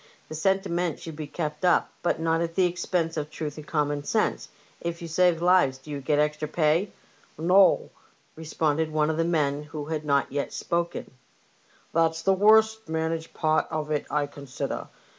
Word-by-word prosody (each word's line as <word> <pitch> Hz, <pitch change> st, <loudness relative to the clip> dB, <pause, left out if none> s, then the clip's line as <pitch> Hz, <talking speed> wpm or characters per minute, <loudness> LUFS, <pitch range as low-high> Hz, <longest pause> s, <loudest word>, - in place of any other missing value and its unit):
'' -, -, -32 dB
The -, -, -6 dB
senti 190 Hz, +5 st, +1 dB
ment 170 Hz, -2 st, -1 dB
should 160 Hz, -2 st, -8 dB
be 150 Hz, -1 st, -6 dB
kept 155 Hz, +2 st, -4 dB
up, 180 Hz, -, +3 dB
but 175 Hz, -, 0 dB
not 165 Hz, 0 st, +1 dB
at 165 Hz, -1 st, -3 dB
the 185 Hz, -, +4 dB
expense 175 Hz, -1 st, -1 dB
of 150 Hz, -1 st, -3 dB
truth 150 Hz, -1 st, -5 dB
and 155 Hz, -, -9 dB
common 145 Hz, -2 st, -1 dB
sense. 215 Hz, +8 st, 0 dB, 0.3 s
If 170 Hz, 0 st, -4 dB
you 170 Hz, -, -6 dB
save 170 Hz, 0 st, +2 dB
lives 175 Hz, -7 st, +4 dB
do 135 Hz, +3 st, -12 dB
you 140 Hz, -1 st, -4 dB
get 145 Hz, +2 st, +1 dB
extra 150 Hz, +1 st, 0 dB
pay? 160 Hz, +5 st, +1 dB, 0.2 s
" -, -, -31 dB
" -, -, -33 dB
No," 180 Hz, +4 st, +4 dB, 0.4 s
responded 160 Hz, 0 st, -1 dB
one 155 Hz, 0 st, +2 dB
of 160 Hz, -, -3 dB
the 165 Hz, -, +2 dB
men 150 Hz, -4 st, 0 dB
who 150 Hz, 0 st, -7 dB
had 155 Hz, 0 st, -3 dB
not 140 Hz, -2 st, +1 dB
yet 140 Hz, +1 st, -3 dB
spoken; 170 Hz, 0 st, -2 dB, 0.4 s
'' -, -, -33 dB
that's 165 Hz, 0 st, +1 dB
the 195 Hz, -, +4 dB
worst 220 Hz, +1 st, +4 dB
managed 160 Hz, 0 st, -2 dB
part 155 Hz, 0 st, +1 dB
of 155 Hz, -1 st, -3 dB
it, 150 Hz, -, -1 dB
I 150 Hz, -1 st, +1 dB
consider. 140 Hz, -2 st, -5 dB
160 Hz, 200 wpm, -26 LUFS, 150-170 Hz, 0.4 s, the